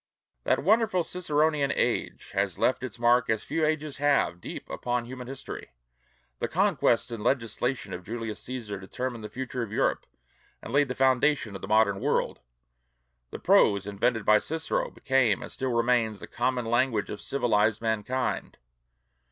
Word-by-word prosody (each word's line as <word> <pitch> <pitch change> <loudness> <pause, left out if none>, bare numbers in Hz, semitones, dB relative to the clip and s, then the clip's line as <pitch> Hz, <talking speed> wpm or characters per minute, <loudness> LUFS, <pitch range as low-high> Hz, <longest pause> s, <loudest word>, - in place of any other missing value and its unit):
That - - +2
wonderful 210 -1 +3
Ciceronian 155 -4 +1
age - - -1
has 100 -2 -1
left 130 - +2
its 130 -4 -6
mark 120 +1 +3
as 110 -1 +1
few 165 - -1
ages 155 -1 -1
have, 140 -11 +2
deep - - -7
upon 120 -1 -2
human 125 0 -8
history. 130 - -8 0.7
The - - -1
conquests - - +2
and 115 -3 -5
legislation 120 -3 -1
of 90 - -6
Julius 115 +2 -5
Cæsar 110 -6 -5
determined 120 +4 -5
the 105 - -6
future 130 -1 -4
of 110 -4 -4
Europe - - 0 0.5
and 115 - -9
laid 145 0 +4
the 125 - -4
foundation 130 -3 +2
of - - -7
the - - -6
modern 105 -2 +3
world. - - 0 0.9
The - - -6
prose 100 -1 +4
invented 105 +2 0
by 105 0 +6
Cicero 160 +1 -1
became 130 -7 +1
and - - -8
still 130 -1 -2
remains 115 -3 +1
the - - -7
common 125 0 -1
language 120 -2 +1
of 105 - -6
civilized 110 -5 +1
mankind. 115 +3 -2
120 Hz, 160 wpm, -27 LUFS, 105-135 Hz, 0.9 s, by